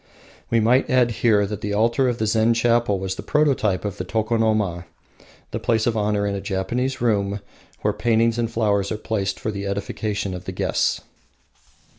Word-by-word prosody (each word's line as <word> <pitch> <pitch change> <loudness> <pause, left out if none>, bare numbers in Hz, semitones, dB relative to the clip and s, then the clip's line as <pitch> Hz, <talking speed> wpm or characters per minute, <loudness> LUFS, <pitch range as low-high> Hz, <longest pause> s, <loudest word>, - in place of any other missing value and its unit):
We 115 - +3
might 120 +4 +3
add 125 -2 +3
here 110 -2 +3
that 105 0 -5
the 105 0 -2
altar 115 +4 +2
of 120 - -2
the 110 - -1
Zen 110 +2 +3
chapel 115 -3 +2
was 95 0 -3
the - - -7
prototype 135 -11 +1
of 100 - -3
the - - -3
Tokonoma, 110 -5 0 0.7
the - - -3
place 110 -1 +1
of 120 - +1
honour 105 -1 0
in 100 - -1
a 100 - -3
Japanese 120 +7 -2
room 100 -3 +1 0.4
where 105 - +1
paintings 115 +1 +1
and 115 -1 0
flowers 105 -4 0
are 110 - -1
placed 100 -3 -2
for 110 - -2
the 100 -1 -4
edification 100 0 -3
of 90 - -7
the - - -4
guests. - - 0
110 Hz, 185 wpm, -22 LUFS, 100-115 Hz, 0.7 s, We